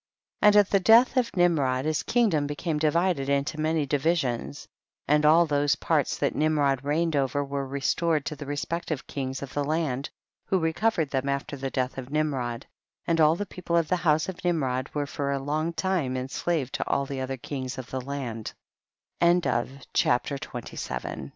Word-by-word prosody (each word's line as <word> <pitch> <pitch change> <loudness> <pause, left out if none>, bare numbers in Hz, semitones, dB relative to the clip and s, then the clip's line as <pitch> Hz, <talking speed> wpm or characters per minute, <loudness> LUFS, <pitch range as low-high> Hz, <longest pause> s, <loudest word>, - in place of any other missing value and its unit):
And 210 0 +6
at 205 -2 +5
the 195 - +4
death 230 +7 +6
of 250 -3 +2
Nimrod 140 -7 +2
his 155 0 0
kingdom 200 -12 +2
became 150 +1 -2
divided 155 -2 +1
into 140 +3 0
many 155 -1 +1
divisions, 135 - -1 0.4
and 150 +1 +3
all 165 +3 +6
those 145 -1 +2
parts 150 -2 0
that - - 0
Nimrod 145 -3 +1
reigned 155 +3 0
over 140 +1 +1
were 140 0 -3
re 140 +1 -5
stored 160 0 +1
to 155 - -3
the 145 -1 -8
respective 155 +1 -3
kings 135 -1 -4
of 135 - -8
the 145 - 0
land, 145 -3 -1 0.4
who 190 - +1
recovered 165 -1 0
them 135 0 -1
after 140 +1 -2
the 135 0 -4
death 130 0 -2
of 130 0 -8
Nimrod, 135 -6 -1 0.4
and 165 -1 +2
all 155 +1 +5
the 205 - -3
people 180 -3 -2
of 165 -2 +1
the 185 - +2
house 155 -2 +2
of 185 -2 -7
Nimrod 135 -7 0
were 145 -1 0
for 140 0 -3
a 140 - 0
long 150 +4 -1
time 170 -7 -1
ens 130 +1 -5
150 Hz, 150 wpm, -26 LUFS, 140-170 Hz, 0.4 s, And